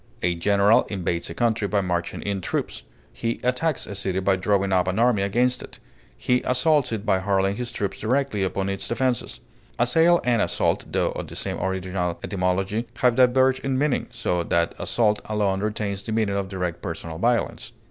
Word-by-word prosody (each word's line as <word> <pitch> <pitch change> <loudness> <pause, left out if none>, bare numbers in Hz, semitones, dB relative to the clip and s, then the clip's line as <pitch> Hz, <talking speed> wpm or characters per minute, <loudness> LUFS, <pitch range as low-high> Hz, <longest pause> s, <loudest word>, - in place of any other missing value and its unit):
A 90 0 +2
general 100 +5 +3
invades 85 -4 -2
a 85 - -7
country 110 +1 +1
by 100 0 +1
marching 90 -2 -2
in 100 -1 -2
troops; - - -3 0.3
he 115 - -3
attacks 125 +5 0
a - - -7
city 95 -1 -2
by 95 0 +2
drawing 100 0 +1
up 90 -1 +2
an 95 +2 -1
army 115 -3 +3
against 125 +6 +1
it; - - -11 0.4
he 125 0 +1
assaults 130 +1 +2
it 110 -2 -3
by 95 - +2
hurling 95 0 +1
his 125 -1 -4
troops 100 -4 -3
directly 125 -2 0
upon 95 0 -1
its 95 0 -3
defenses. 125 0 -1 0.4
Assail 165 +8 +4
and 120 -3 +2
assault, - - 0
tho - - +1
of - - -6
the - - -10
same - - -3
original 95 -2 -2
etymology, 95 +4 -1
have 125 0 +3
diverged 130 +1 +4
in 135 -1 0
meaning, 145 0 0
so 90 -1 -1
that 85 0 +1
assault 105 -3 +1
alone 105 -3 0
retains 105 -1 -2
the 105 - -6
meaning 110 -3 0
of 100 -1 -2
direct 90 -3 -3
personal 80 -3 -5
violence. 120 +3 0
100 Hz, 185 wpm, -24 LUFS, 95-120 Hz, 0.4 s, Assail